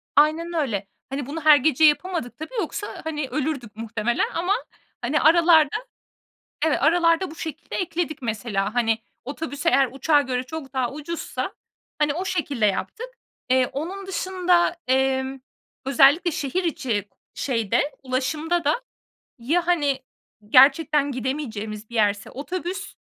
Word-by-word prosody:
Aynen 315 +3 +3
öyle. 230 - -1 0.2
Hani, 275 0 -3
bunu 305 +5 -5
her 300 -1 +9
gece 310 +2 +2
yapamadık 310 -3 +2
tabii 315 +10 -8
yoksa, 410 +3 -4
hani, 300 -3 -3
ölürdük 275 -7 -3
muhtemelen 225 +1 -1
ama, 355 +4 +1 0.5
hani, 265 +6 +1
aralarda 320 -2 +5 0.9
Evet, 320 -2 +2
aralarda 335 +3 +3
bu 315 - -10
şekilde 320 0 -6
ekledik 335 -5 -2
mesela. 215 -2 -2
Hani, 225 -2 +2 0.3
otobüs 285 +2 -5
eğer 275 -5 +4
uçağa 290 +2 +3
göre 250 -1 -2
çok 275 0 -8
daha 260 -2 -1
ucuzsa, 305 +3 -4 0.5
hani, 295 -1 +2
o 360 +4 -3
şekilde 290 - 0
yaptık. 445 - -2 0.4
Eee, 255 0 +4
onun 375 +7 -5
dışında, 365 -2 +1
emm, 265 +1 +1 0.5
özellikle 285 +5 +5
şehir 320 +4 -2
içi 230 - -2 0.3
şeyde, 240 +2 0
ulaşımda 300 +6 -1
da 305 +12 +1 0.6
ya, 330 +9 0
hani, 290 -6 +2 0.5
gerçekten 280 +3 +5
gidemeyeceğimiz 225 -5 -4
bir 235 - -9
yerse 205 -2 +1
otobüs 365 +7 -5
290 Hz, 130 wpm, -24 LUFS, 255-330 Hz, 0.9 s, her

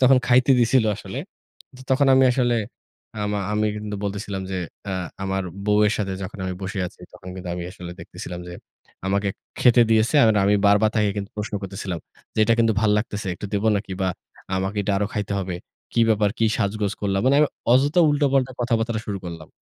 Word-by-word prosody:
তো - - -9
তখন 130 0 +6
খাইতে 125 +2 +4
দিছিল 120 +1 +4
আসলে। 105 +4 -7 0.7
তখন 135 +1 +4
আমি 130 0 +6
আসলে 120 -2 +2 0.6
আ - - -3 0.3
আমি 105 0 +1
কিন্তু 105 0 -5
বলতেছিলাম 100 -1 -3
যে, 95 - -2 0.3
আ - - -2 0.3
আমার 95 0 -1 0.2
বউয়ের 105 0 +4
সাথে 100 -3 -1
যখন 95 +2 -7
আমি 95 - -3
বসে 95 +1 -4
আছি - - -12
তখন 90 - -12
কিন্তু 95 -1 -7
আমি 90 -1 -5
আসলে 90 -1 -9
দেখতেছিলাম 90 0 -8
যে, - - -7 0.5
আমাকে 100 +1 +1 0.3
খেতে 120 -1 +6
দিয়েছে। 110 +4 +3 0.3
আমি 100 - +4
বারবার 105 +2 +4
তাকে 105 -2 +3
কিন্তু 100 0 -4
প্রশ্ন 105 0 -4
করতেছিলাম 95 -2 -4 0.4
যে, - - -5
"এটা 115 - +4
কিন্তু 115 -1 +4
ভাল 110 - +3
লাগতেছে। 105 -2 -4
একটু 105 - -6
দিব 100 +1 0
নাকি? 100 -1 -5
বা 95 - +2 0.5
আমাকে 95 +2 -2
এটা 100 0 0
আরো 100 +1 +1
খাইতে 105 -1 -2
হবে। 95 -2 -3 0.4
কী 115 - +2
ব্যাপার? 105 -2 +3
কি 115 - +2
সাজগোজ 100 0 0
করলা?" 100 -1 0
মানে 135 +2 +4
আমি 150 - +4 0.2
অযথা 145 +7 +4
উলটোপাল্টা 140 -3 +2
কথাবার্তাটা 115 -2 0
শুরু 100 -2 -3
করলাম। 85 -3 -7
105 Hz, 190 wpm, -23 LUFS, 95-115 Hz, 0.7 s, তখন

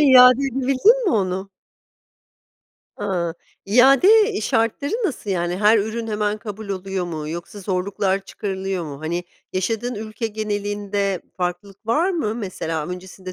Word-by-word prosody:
iade 255 -2 +8
edebildin 270 - +3
mi 385 - +2
onu? 190 -1 -1 1.5
Hıı, 170 -3 -1 0.3
iade, 275 - +6
iii, 220 - -3
şartları 230 - 0
nasıl? 235 - -4
Yani, 175 -1 0
her 210 +2 +5
ürün 220 +2 -2
hemen 210 -1 -1
kabul 215 -1 -7
oluyor 190 -1 -3
mu 155 -3 -5
yoksa 170 +5 -6
zorluklar 190 +1 0
çıkarılıyor 190 -3 -3
mu? 140 -2 -8
Hani, 170 +3 -2 0.3
yaşadığın 225 +6 -1
ülke 215 +2 -4
genelinde 205 -2 -2
farklılık 185 +3 -4
var 315 +11 +2
mı? 305 - -1
Mesela, 165 -8 -3
öncesinde 185 +1 -8
205 Hz, 130 wpm, -22 LUFS, 185-230 Hz, 1.5 s, iade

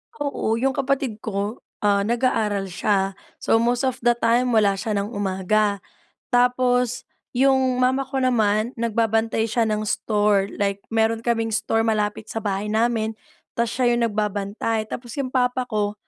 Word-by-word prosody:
Oo, 280 -6 -1
yung 265 +3 +1
kapatid 270 -5 -1
ko, 205 +1 -3 0.2
ah, 200 -1 +3
nag-aaral 220 -5 0
siya 195 +1 +1 0.3
so, 225 - +2
most 240 +2 +1
of 260 -1 -1
the 240 0 +3
time, 240 +1 +2
wala 205 -2 +4
siya 215 -2 -2
ng 200 +3 -2
umaga. 200 0 0 0.5
Tapos 245 0 +2 0.3
yung 260 0 +3
mama 260 +2 +2
ko 270 0 -4
naman, 225 -2 +1
nagbabantay 225 -1 0
siya 230 +2 0
ng 215 0 -1
store, 205 -2 +1
like 200 0 -1
meron 225 0 +1
kaming 225 -2 0
store 225 +1 +1
malapit 210 -1 -1
sa 225 - -5
bahay 200 0 -2
namin, 220 0 0 0.4
ta's 235 -1 0
siya 245 -1 +2
yung 235 - 0
nagbabantay. 210 +1 -1
Tapos 240 -2 -6
yung 265 -2 -2
papa 250 0 +1
ko, 210 -1 -1
225 Hz, 155 wpm, -23 LUFS, 210-245 Hz, 0.5 s, wala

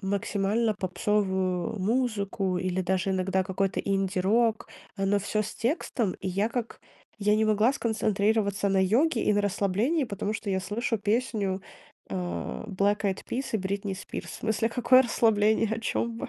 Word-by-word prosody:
максимально 205 +2 0
попсовую 190 0 -1
музыку 200 -4 0
или 185 0 -1
даже 190 +1 0
иногда 190 0 +1
какой-то 195 +1 -1
инди-рок, 195 +4 +1 0.3
э, 195 - -1
но 205 +1 +3
всё 215 +2 -1
с 215 - -6
текстом. 235 - -1
И - - -3
я 200 +4 0
как 235 -1 -4 0.4
я 210 +1 +3
не 220 +1 +2
могла 215 +4 +3
сконцентрироваться 210 -3 +1
на 195 -1 +2
йоге 235 - +2
и - - +3
на 205 - +2
расслаблении, 205 - +1
потому 205 -1 -3
что 215 -1 -4
я 190 0 0
слышу 225 +4 -2
песню, 210 -3 0 0.5
э, - - -5
Black 195 +2 -1
Eyed 195 -2 -1
Peas 265 +3 -2
и - - +3
Бритни 195 0 -3
Спирс. 190 - -7
В - - -8
смысле, 220 +1 0
какое 245 +2 +5
расслабление, 220 -2 +2
о 225 - -5
чём 230 0 -2
вы? - - -5
205 Hz, 160 wpm, -27 LUFS, 195-225 Hz, 0.5 s, какое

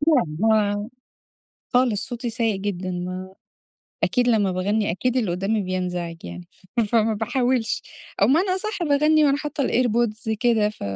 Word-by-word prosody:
يعني 160 - 0
هو 210 -1 +2 0.9
خالص 245 -5 +2
صوتي 240 -1 -4
سيء 225 -3 0
جدًا 185 -2 -3
ما 185 +1 -5 0.7
أكيد 245 -1 +2
لمّا 205 -5 +2
باغنّي 205 +4 0
أكيد 245 +8 -1
اللي 225 -8 +1
قدامي 195 +4 0
بينزعج 180 -2 -3
يعني 85 0 -8 0.3
ف - - +4
فما 220 0 +2
باحاولش 245 +1 0 0.4
أو - - +7
بمعنى 325 - +3
أصح 405 0 -3
باغنّي 305 0 +4
وأنا 280 -1 +3
حاطة 290 -2 -2
الairpods 230 -2 +1
كده 230 -4 +3
ف 210 - -10
220 Hz, 150 wpm, -23 LUFS, 190-250 Hz, 0.9 s, أو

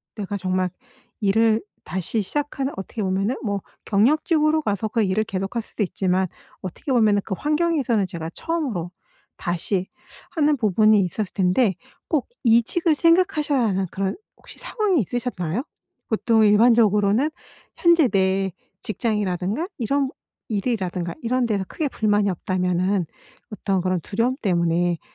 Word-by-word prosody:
내가 205 -2 -4
정말 185 -1 0 0.5
일을 220 +2 +3 0.2
다시 190 +5 -2
시작하는 280 +4 -2
어떻게 195 +3 -5
보면은 195 +5 0
뭐 200 -3 -1 0.2
경력직으로 305 - +3
가서 210 -3 -1
그 225 +1 +1
일을 200 +2 +1
계속할 195 +3 -3
수도 215 - -3
있지만 185 0 0 0.3
어떻게 185 - -5
보면은 215 -5 +4
그 - - -3
환경에서는 295 - +1
제가 165 -2 -6
처음으로 255 - -3 0.5
다시 180 +2 -2 0.4
하는 300 -2 +2
부분이 215 -1 +4
있었을 190 +2 -3
텐데 190 +2 +2 0.3
꼭 305 -5 0 0.2
이직을 240 +8 +4
생각하셔야 330 -5 +3
하는 190 -2 0
그런 195 - -2 0.2
혹시 - - -12
상황이 400 - +1
있으셨나요? 225 -2 -2 0.5
보통 220 0 +3
일반적으로는 215 +3 +4 0.5
현재 340 -4 +5
내 190 -1 +1 0.3
직장이라든가 210 - -1
이런 270 +4 +1 0.4
일이라든가 195 -5 -2
이런 245 +1 +1
데서 205 -3 0
크게 310 -3 -2
불만이 210 -4 +1
없다면은 180 0 0 0.4
어떤 195 -3 -1
그런 185 -1 0
두려움 230 +9 0
때문에 175 -2 +1
210 Hz, 325 characters per minute, -23 LUFS, 190-255 Hz, 0.5 s, 현재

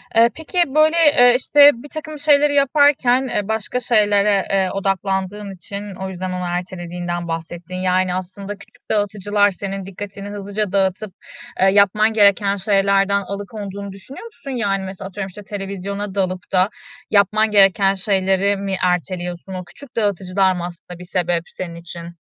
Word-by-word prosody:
Eee, 230 +1 +6
peki, 320 +3 -8 0.2
böyle, 310 +2 +4
eee, 285 -7 +6
işte, 290 +2 +6
birtakım 310 +1 -8
şeyleri 290 -1 +4
yaparken, 275 -2 +3
eee, 210 -5 -2
başka 220 +3 -2
şeylere, 205 -4 +2
eee, 190 -1 +2
odaklandığın 195 +1 -2
için 200 +2 -8
o 190 +1 -5
yüzden 185 0 -5
onu 180 0 -3
ertelediğinden 175 -1 -4
bahsettin, 165 +2 -6
yani, 185 0 +1
aslında 195 +2 -6
küçük 200 - -20
dağıtıcılar 205 -1 +1
senin 195 0 -5
dikkatini 200 +1 -8
hızlıca 205 0 -4
dağıtıp, 195 +1 0 0.5
eee, 190 - +4
yapman 205 +3 +4
gereken 200 -1 +4
şeylerden 200 0 +2
alıkonduğunu 200 0 -6
düşünüyor 200 - -10
musun? 280 -12 -9
Yani 200 -6 -1
mesela 190 0 -7
atıyorum, 195 0 -5
işte, 200 +2 -11
televizyona 200 0 -5
dalıp 185 -2 -2
da 185 +1 +3 0.4
yapman 215 +2 +3
gereken 195 -1 +4
şeyleri 195 0 +1
mi 195 -1 -2
erteliyorsun? 180 0 -2
O 185 -1 -5
küçük 255 +9 -13
dağıtıcılar 190 -3 +1
mı 175 - -4
aslında 175 0 -10
bir 180 - -9
sebep 175 -2 -1
senin 170 -2 -7
için? 170 0 -9
195 Hz, 150 wpm, -20 LUFS, 185-210 Hz, 0.5 s, Eee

